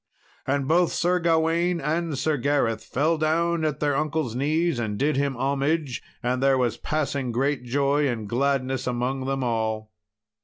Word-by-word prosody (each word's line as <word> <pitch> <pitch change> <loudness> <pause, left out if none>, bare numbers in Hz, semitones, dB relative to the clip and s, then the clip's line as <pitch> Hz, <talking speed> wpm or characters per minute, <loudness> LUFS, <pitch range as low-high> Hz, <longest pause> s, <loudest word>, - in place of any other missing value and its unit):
And 140 0 0
both 170 +2 +3
Sir 180 +1 +1
Gawain 170 +1 +2
and 160 0 -1
Sir 155 +3 +1
Gareth 130 -5 0
fell 155 +4 0
down 165 +1 +1
at 155 -2 -1
their 145 -2 +1
uncle's 150 -4 -1
knees 155 +2 +1
and 105 -3 -2
did 150 +5 +1
him 140 -2 0
homage, 140 +1 0 0.2
and 125 +1 0
there 135 0 +4
was 120 -3 0
passing 140 -4 -2
great 135 +2 0
joy 140 +3 +1
and 115 -5 -3
gladness 130 +2 0
among 125 +2 -1
them 135 0 -1
all. 110 -2 -2
140 Hz, 160 wpm, -25 LUFS, 125-155 Hz, 0.2 s, there